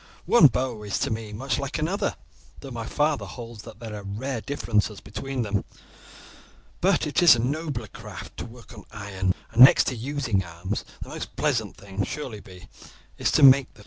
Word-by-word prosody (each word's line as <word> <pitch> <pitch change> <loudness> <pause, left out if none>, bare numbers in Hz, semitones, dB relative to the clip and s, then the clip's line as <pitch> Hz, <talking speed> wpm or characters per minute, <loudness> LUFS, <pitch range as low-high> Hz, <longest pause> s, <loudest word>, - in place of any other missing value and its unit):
One 175 -11 +8
bow 125 -3 -2
is 100 -2 -2
to - - -1
me 110 -1 -4
much 130 +6 -2
like 140 +2 -3
another, 165 +6 -1 0.5
though 135 - -9
my 115 -2 -5
father 150 -1 0
holds 115 -3 -9
that 110 -1 -12
there 115 -2 -7
are 105 - -6
rare 110 +5 -4
differences 110 -7 -1
between 125 +5 -4
them; 105 -2 -1 1.2
but 190 0 +3
it 150 +2 +1
is 170 -7 +9
a - - -2
nobler 140 -1 -2
craft 105 -6 -10
to - - -5
work 120 +1 -14
on 105 - -11
iron, 95 -4 -2 0.2
and 120 +2 +8
next 130 - +8
to 130 - -4
using 120 -5 -1
arms 90 +4 -5 0.2
the - - -12
most - - -7
pleasant - - -1
thing 100 0 -4
surely 105 -11 -7 0.5
is - - +2
to - - +4
make 135 -1 +7
them. - - -19
115 Hz, 185 wpm, -25 LUFS, 105-135 Hz, 1.2 s, is